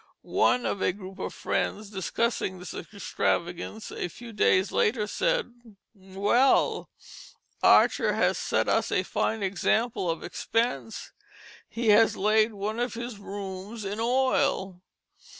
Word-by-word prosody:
One 250 - +2
of 200 - -2
a - - +2
group 190 -1 -10
of - - -3
friends, 210 0 -2
discussing 190 0 -1
this 180 0 -8
extravagance 180 +1 -3
a - - -3
few 230 +6 -11
days 190 -1 +3
later, 215 -1 +1
said: 485 - -1 0.4
"Well! 200 +6 +1 0.7
Archer - - +5
has - - +1
set - - 0
us - - +1
a - - +2
fine 220 -2 -1
example 195 +1 0
of 165 -1 -2
expense, 230 -1 -2 0.6
he 230 -1 -1
has 220 +2 +5
laid 215 +2 +3
one 210 +3 -3
of 245 0 -2
his 235 -2 -6
rooms 200 +2 -7
in 205 +2 -4
oil." 230 -7 +1
210 Hz, 130 wpm, -27 LUFS, 190-230 Hz, 0.7 s, Archer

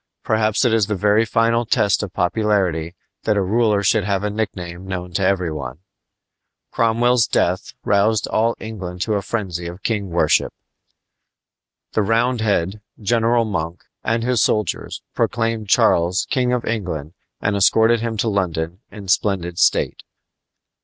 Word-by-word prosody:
Perhaps 110 +1 +1
it 120 - +3
is 110 -4 +2
the 105 - -1
very 105 +3 +3
final 115 +1 +2
test 110 -4 +2
of 100 -4 -5
popularity 90 -4 0 0.3
that 105 - +2
a - - +2
ruler 105 +1 +2
should 110 0 +3
have 100 0 -1
a 105 - -1
nickname 95 -4 -4
known 90 -1 -5
to 95 - -1
every 95 -3 +1
one. 70 -3 -6 0.9
Cromwell's 115 +1 +2
death 90 +2 0
roused 105 +2 +2
all 115 +1 +1
England 95 -5 -7
to 110 - -1
a 100 - 0
frenzy 95 -5 -3
of 90 +2 -9
king 105 -4 -1
worship. 85 -3 +2 1.4
The 110 - +1
Roundhead, 110 -3 +1 0.2
General 115 +2 +2
Monk, 85 -5 -4 0.2
and 115 +1 0
his 125 -2 +1
soldiers 105 -1 -1
proclaimed 115 -2 -1
Charles 85 +1 +3
King 125 -3 +1
of 125 -1 -1
England 90 -9 -3 0.3
and 100 0 0
escorted 110 +4 +4
him 115 -1 -3
to 115 - 0
London 90 -4 -1
in 105 -3 -10
splendid 90 -3 0
state. - - +2
105 Hz, 145 wpm, -20 LUFS, 90-115 Hz, 1.4 s, escorted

